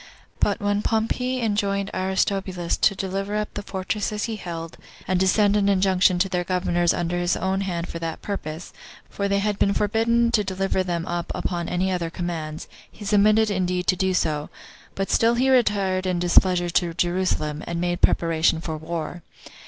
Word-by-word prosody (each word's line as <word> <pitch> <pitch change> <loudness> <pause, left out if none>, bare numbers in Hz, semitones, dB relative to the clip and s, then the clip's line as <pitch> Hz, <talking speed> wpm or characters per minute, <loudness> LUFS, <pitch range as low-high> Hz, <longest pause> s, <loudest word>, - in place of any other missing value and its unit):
But 205 - +1
when 205 -1 0
Pompey 245 +4 0
enjoined 200 -2 0
Aristobulus 190 -1 -1
to 200 - +2
deliver 195 +2 -3
up 210 0 -2
the 205 - -4
fortresses 205 +2 -3
he 225 -2 -2
held, 165 -5 -7 0.3
and 185 -1 +1
to 190 - +3
send 205 +1 +3
an 200 -1 +3
injunction 185 -1 +3
to 185 +2 +2
their 180 -2 -1
governors 175 -1 +1
under 175 0 -1
his 175 0 +1
own 190 +1 -1
hand 175 -3 -3
for 170 - -6
that 165 -1 -5
purpose, 165 -4 -5 0.4
for 200 - -2
they 200 0 +1
had 205 0 -1
been 200 - +2
forbidden 230 +3 +2
to 215 -3 +2
deliver 190 0 -1
them 175 -2 -2
up 175 -1 -3
upon 170 -2 -3
any 185 +2 0
other 175 -2 -1
commands, 165 -3 -5 0.2
he 210 - -11
submitted 210 +1 +4
indeed 180 -2 -1
to 185 - +3
do 190 0 0
so; 150 -4 0 0.5
but 195 0 -2
still 230 +1 +3
he 260 +2 +2
retired 195 -7 +2
in 180 -1 0
displeasure 175 0 +3
to 170 0 0
Jerusalem, 175 -4 -1
and 170 0 -3
made 175 0 -1
preparation 165 -1 +2
for 160 -1 -4
war. 165 +2 -5
185 Hz, 180 wpm, -24 LUFS, 175-205 Hz, 0.5 s, submitted